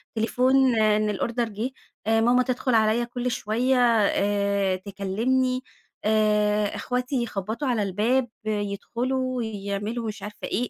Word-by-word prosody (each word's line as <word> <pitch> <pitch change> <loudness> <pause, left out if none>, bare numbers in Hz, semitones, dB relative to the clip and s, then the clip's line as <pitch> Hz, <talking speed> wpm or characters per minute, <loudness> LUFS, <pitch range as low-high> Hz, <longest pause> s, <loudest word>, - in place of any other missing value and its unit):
تليفون 255 +3 +3
إن 215 0 +3
الأوردر 230 +3 -1
جه، 220 +5 -3 0.4
آآ 225 0 +3
ماما 245 +2 +4
تدخل 255 0 0
عليَّ 220 +2 +3
كل 245 +1 -3
شويّة 240 +5 0 0.3
آآ، 200 -1 +1
تكلمني، 225 +7 -1 0.4
آآ، 210 -1 +2
أخواتي 250 +2 -2
يخبطوا 220 +5 -3
على 235 -4 +1
الباب، 225 +7 +1 0.2
يدخلوا، 240 +5 -2
يعملوا 210 +2 -4
مش 215 -1 -6
عارفة 210 0 -7
إيه، 245 +4 -1
220 Hz, 125 wpm, -25 LUFS, 205-250 Hz, 0.4 s, ماما